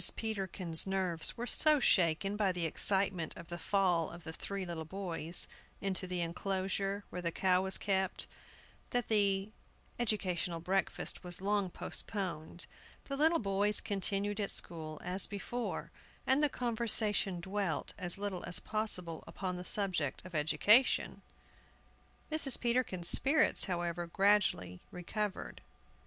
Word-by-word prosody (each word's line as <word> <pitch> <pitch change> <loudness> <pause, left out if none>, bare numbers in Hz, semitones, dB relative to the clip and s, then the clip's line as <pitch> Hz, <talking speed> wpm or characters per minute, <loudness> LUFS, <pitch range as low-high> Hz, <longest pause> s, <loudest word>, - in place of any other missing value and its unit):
PETERKIN'S 190 -6 0
nerves 185 -4 +2
were 240 - -4
so 300 +4 +4
shaken 190 -2 +2
by 205 -2 +1
the 175 -2 -3
excitement 190 0 +4
of 170 - -11
the 175 0 -6
fall 180 -3 +1
of 170 0 -11
the 160 0 -7
three 195 +3 -5
little 170 -2 -5
boys 170 -1 -1 0.3
into 190 -2 -2
the 180 -1 -3
enclosure 195 +3 -3
where 180 - -5
the 170 -1 -2
cow 185 +1 +1
was 190 0 +1
kept 190 -2 -1 0.6
that 245 -1 -1
the 200 -1 +1 0.5
educational 185 -7 0
breakfast 190 +4 -2
was 175 -1 -5
long 200 0 -1
postponed. 175 -2 -3 0.4
The 275 - -5
little 320 +4 +3
boys 205 -1 0
continued 200 +1 -1
at 200 - -1
school, 155 -2 -4
as 180 +2 -1
before, 235 +4 -5 0.3
and 265 +3 +3
the 295 - +3
conversation 220 -6 0
dwelt 190 -1 -3
as 175 0 0
little 200 -3 -4
as 175 - +2
possible 180 -7 -3
upon 185 -2 -5
the 180 - -7
subject 180 -7 +1
of 185 - -11
education. 205 - +2 1.1
Mrs. 300 -5 +7
Peterkin's 235 -8 -1
spirits, 300 +3 +5
however, 175 -2 -3
gradually 180 - +1
recovered. 205 +3 -5
190 Hz, 135 wpm, -33 LUFS, 175-205 Hz, 1.1 s, Mrs